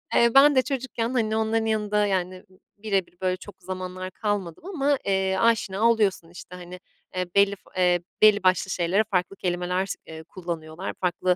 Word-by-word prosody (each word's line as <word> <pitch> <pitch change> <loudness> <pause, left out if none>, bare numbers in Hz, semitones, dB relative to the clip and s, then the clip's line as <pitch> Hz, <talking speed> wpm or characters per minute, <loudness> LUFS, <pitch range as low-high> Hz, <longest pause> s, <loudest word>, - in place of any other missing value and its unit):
Eee, 235 0 +5
ben 285 +1 +7
de 260 - +6
çocukken, 255 -4 -3
hani, 220 -3 0
onların 220 0 0
yanında, 210 -1 +1
yani, 185 -2 -2
b 185 - -23 0.3
birebir, 195 -4 -1
böyle, 185 0 0
çok 200 +1 -12
zamanlar 185 0 -6
kalmadım 205 - -3
ama, 290 -7 0
eee, 190 -1 +1
aşina 225 -1 +2
oluyorsun. 200 -7 +1
İşte, 180 +1 -11
hani, 180 0 -10 0.4
eee, 185 0 -1
belli 200 0 +4
f - - -30 0.2
eee, 180 -1 +3 0.2
belli 210 -2 +6
başlı 185 +1 +2
şeylere 180 +5 +1
farklı 185 +1 0
kelimeler 180 0 -1
s 195 - -4
eee, 160 0 -9
kullanıyorlar. 170 0 -6
Farklı, 180 0 +1
190 Hz, 175 wpm, -25 LUFS, 180-220 Hz, 0.4 s, ben